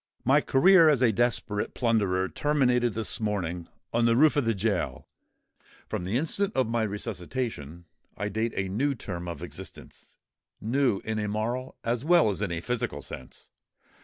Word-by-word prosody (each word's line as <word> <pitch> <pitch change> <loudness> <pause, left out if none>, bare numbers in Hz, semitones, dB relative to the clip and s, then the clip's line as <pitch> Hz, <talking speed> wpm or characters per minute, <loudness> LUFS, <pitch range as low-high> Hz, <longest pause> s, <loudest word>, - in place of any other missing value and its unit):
My - - +5
career 165 +4 +6
as 135 -4 +3
a 115 - +5
desperate 115 -2 -1
plunderer 100 -6 +1
terminated 125 -3 +1
this 115 0 -2
morning—on 95 +1 -2
the 115 0 +4
roof 150 +4 +5
of 145 -4 +1
the 115 -1 +1
gaol: 100 -1 -2 0.8
from 90 - -4
the 100 +6 0
instant 195 +8 0
of 130 - +3
my 115 0 0
resuscitation 100 - -4 0.3
I 105 - -2
date 110 +3 -2
a 95 - -1
new 135 +9 0
term 90 -6 -6
of 85 -4 -6
existence—new 120 -2 -4
in 110 -1 -2
a 105 - -2
moral 120 +5 -3
as 120 +1 -1
well 165 -7 +4
as 100 - -4
in 100 -4 -1
a 80 -1 -3
physical 100 - -3
sense. 65 - -9
115 Hz, 160 wpm, -27 LUFS, 95-125 Hz, 0.8 s, career